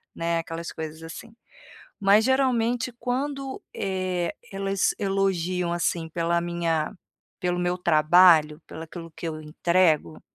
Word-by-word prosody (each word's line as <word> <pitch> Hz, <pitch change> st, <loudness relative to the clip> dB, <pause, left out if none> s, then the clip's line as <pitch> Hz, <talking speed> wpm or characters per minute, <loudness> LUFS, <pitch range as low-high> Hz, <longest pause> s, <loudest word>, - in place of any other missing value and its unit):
né, 170 Hz, 0 st, 0 dB
aquelas 165 Hz, 0 st, -6 dB
coisas 160 Hz, 0 st, -7 dB
assim. 165 Hz, +7 st, -10 dB, 0.6 s
Mas 205 Hz, +2 st, +4 dB
geralmente 255 Hz, -2 st, +1 dB
quando, 270 Hz, +1 st, -3 dB
eh, 185 Hz, -3 st, -2 dB, 0.2 s
elas 195 Hz, 0 st, 0 dB
elogiam 185 Hz, -3 st, 0 dB
assim 170 Hz, -1 st, -1 dB
pela 170 Hz, +1 st, 0 dB
minha, 170 Hz, -1 st, -1 dB, 0.5 s
pelo 180 Hz, -2 st, -1 dB
meu 175 Hz, 0 st, 0 dB
trabalho, 155 Hz, -1 st, +5 dB
pela 160 Hz, -, -8 dB
aquilo 165 Hz, +1 st, -9 dB
que -, -, -7 dB
eu 155 Hz, 0 st, -6 dB
entrego, 155 Hz, -, +1 dB
175 Hz, 120 wpm, -25 LUFS, 165-195 Hz, 0.6 s, trabalho